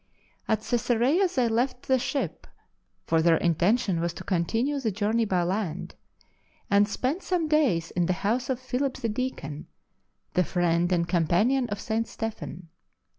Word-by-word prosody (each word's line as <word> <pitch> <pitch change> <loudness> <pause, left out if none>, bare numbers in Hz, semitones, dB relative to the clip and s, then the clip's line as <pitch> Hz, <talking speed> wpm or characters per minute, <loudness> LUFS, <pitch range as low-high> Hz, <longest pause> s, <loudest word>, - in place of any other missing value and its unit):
At 220 -1 0
Cesarea 245 - +2
they 250 -3 +3
left 245 +3 0
the 260 -1 +3
ship— 275 +3 -3 0.6
for 165 -1 +2
their 165 0 +4
intention 180 +4 +2
was 170 0 -2
to - - -8
continue 225 - 0
the 240 -5 0
journey 220 +3 +1
by 185 -4 +1
land 180 -2 -2 0.4
— - - -38
and 200 +1 +5
spent 270 - -1
some 355 -4 0
days 265 - +2
in 175 -1 0
the 185 - +2
house 245 +5 0
of 255 -2 0
Philip 260 +1 -2
the 230 - -2
Deacon, 210 - -4 0.7
the 180 - +3
friend 175 +1 +1
and 170 -1 +1
companion 190 - +2
of 205 0 -3
St. 225 0 -1
Stephen. 210 -6 -6
220 Hz, 160 wpm, -27 LUFS, 175-255 Hz, 0.7 s, and